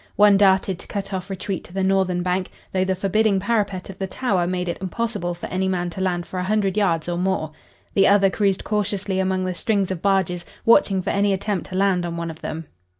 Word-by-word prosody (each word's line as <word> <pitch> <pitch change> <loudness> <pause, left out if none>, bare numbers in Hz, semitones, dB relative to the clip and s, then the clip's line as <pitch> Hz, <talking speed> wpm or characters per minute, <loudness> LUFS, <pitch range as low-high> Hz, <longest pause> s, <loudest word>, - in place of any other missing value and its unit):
One 205 -1 +6
darted 190 -2 +3
to - - -12
cut 200 -1 -4
off 185 +1 -4
retreat 190 -1 -4
to 175 - -14
the 190 0 -1
northern 190 -2 +1
bank, 185 +1 -1 0.2
though 185 -1 +1
the 190 0 0
forbidding 200 +2 +2
parapet 200 -3 -1
of 195 -1 -10
the 195 - -2
Tower 190 -5 0
made 180 0 -2
it 170 - -3
impossible 195 -2 -2
for 175 - -7
any 190 +1 0
man 175 -2 -1
to 190 - -6
land 175 -2 0
for 185 - -5
a - - -1
hundred 200 -1 +1
yards 175 -6 +1
or 175 0 -1
more. 180 -4 -1 0.4
The 195 - +5
other 195 -1 +5
cruised 200 -2 +1
cautiously 200 -2 -1
among 185 0 0
the 185 - -1
strings 200 0 0
of 180 -3 -4
barges, 190 -3 +1 0.2
watching 205 -6 +4
for - - -1
any 200 0 +2
attempt 195 -2 -2
to 185 - -6
land 190 -2 +2
on 170 -1 -4
one 170 -1 -3
of 160 - -13
them. 160 +1 -5
190 Hz, 230 wpm, -22 LUFS, 180-200 Hz, 0.4 s, One